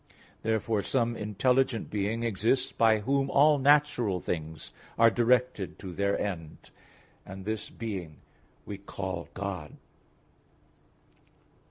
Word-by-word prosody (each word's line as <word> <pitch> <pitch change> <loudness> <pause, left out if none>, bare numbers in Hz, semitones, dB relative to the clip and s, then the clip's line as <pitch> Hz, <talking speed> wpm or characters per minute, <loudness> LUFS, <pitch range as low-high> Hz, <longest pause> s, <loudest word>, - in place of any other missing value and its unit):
Therefore 110 -1 0
some 120 +2 0
intelligent 115 +3 +1
being 105 +3 -1
exists 115 +4 +1
by 110 -2 +3
whom 135 +4 +1
all 145 +1 +5
natural 140 -8 +3
things 80 -3 -5 0.2
are 115 0 +6
directed 120 -4 +1
to 95 -3 -8
their 100 +2 +1
end; 80 -6 -5 0.5
and 95 0 -9
this 110 0 -3
being 95 -9 -6 0.5
we 100 -1 -6
call 95 -3 -5
God. 90 -6 -5
110 Hz, 110 wpm, -29 LUFS, 95-125 Hz, 0.5 s, are